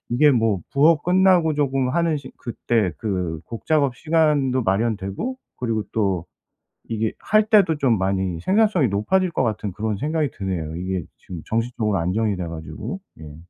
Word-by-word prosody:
이게 145 +5 +5
뭐 115 -7 +2
부업 150 +2 +4
끝나고 180 -3 +4
조금 135 -3 0
하는 165 +2 +1
시 130 - -11
그때 115 -5 -1
그 90 -7 -2
곡 115 - -8
작업 140 -6 +2
시간도 150 -5 +2
마련되고 105 - -1 0.2
그리고 115 -3 -1
또 95 -6 0 0.6
이게 110 -1 -1
할 215 0 +3
때도 195 -8 +4
좀 125 -7 +2
많이 95 -2 -1
생산성이 195 - +3
높아질 175 - +1
것 - - 0
같은 105 -3 -2
그런 105 0 -2
생각이 150 +2 -1
드네요, 85 -5 -3
이게 90 0 -3
지금 90 -3 -9
정신적으로 115 -3 -1
안정이 100 +5 0
돼 90 - -3
가지고. 80 - -6 0.2
예. 75 -2 -10
115 Hz, 325 characters per minute, -22 LUFS, 95-155 Hz, 0.6 s, 이게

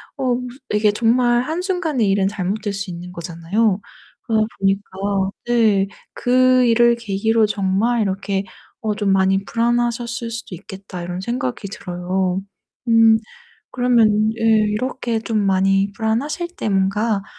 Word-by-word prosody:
어 255 -3 0
무슨 250 0 -6 0.2
이게 210 0 +3
정말 240 +2 +2
한순간에 325 - -1
일은 195 0 +2
잘못될 205 +1 -3
수 200 -1 -5
있는 175 +1 -7
거잖아요. 180 +5 -1 0.4
그러다 220 -2 +1
보니까 195 +1 0 0.6
네 220 -5 +3 0.3
'그 255 +1 +3
일을 235 0 +4
계기로 220 0 +1
정말 210 +3 +1
이렇게 195 0 -1 0.4
어 215 -2 -1
좀 205 -2 -1
많이 195 0 +2
불안하셨을 235 0 -1
수도 225 -5 -6
있겠다.' 190 -1 -9
이런 175 +1 -5
생각이 200 - -3
들어요. 185 -1 -2 0.5
음. 225 -1 +6 0.6
그러면 220 -4 +3
예 225 - -4
이렇게 225 +2 +1
좀 220 0 -2
많이 195 +1 +2
불안하실 275 +10 -1
때 - - -2
뭔가 195 +2 +1
215 Hz, 280 characters per minute, -20 LUFS, 195-235 Hz, 0.6 s, 음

